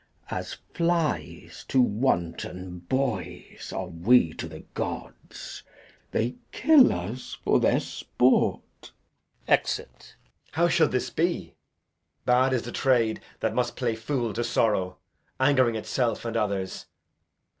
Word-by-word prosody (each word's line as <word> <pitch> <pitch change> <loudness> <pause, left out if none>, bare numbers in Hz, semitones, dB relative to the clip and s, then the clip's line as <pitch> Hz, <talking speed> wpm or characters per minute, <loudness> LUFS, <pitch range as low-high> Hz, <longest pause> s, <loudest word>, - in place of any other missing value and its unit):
As - - -4 0.2
flies 170 -2 -1
to 130 - +2
wanton 90 -6 0
boys 100 -10 -3
are 95 - -3
we 90 +1 +3
to 80 - -6
th' 80 0 -12
gods. - - -6 0.5
They 120 +3 -1
kill 290 0 +6
us 100 +9 -5
for - - +3
their - - +3
sport. - - 0 0.5
Edg. - - +4
[aside] - - -15 0.5
How 170 +2 +3
should 165 -2 +3
this 125 - -1
be? 170 +2 -1 0.7
Bad 125 +2 +4
is 125 -2 0
the 120 - -6
trade 120 -5 +2 0.2
that - - 0
must 120 -1 0
play 120 -3 0
fool 115 0 -2
to 120 - -1
sorrow, 105 -6 +1 0.4
Ang'ring 130 -4 +4
itself 115 +1 -1
and 115 0 -3
others. 100 -4 -2
120 Hz, 125 wpm, -26 LUFS, 95-130 Hz, 0.7 s, kill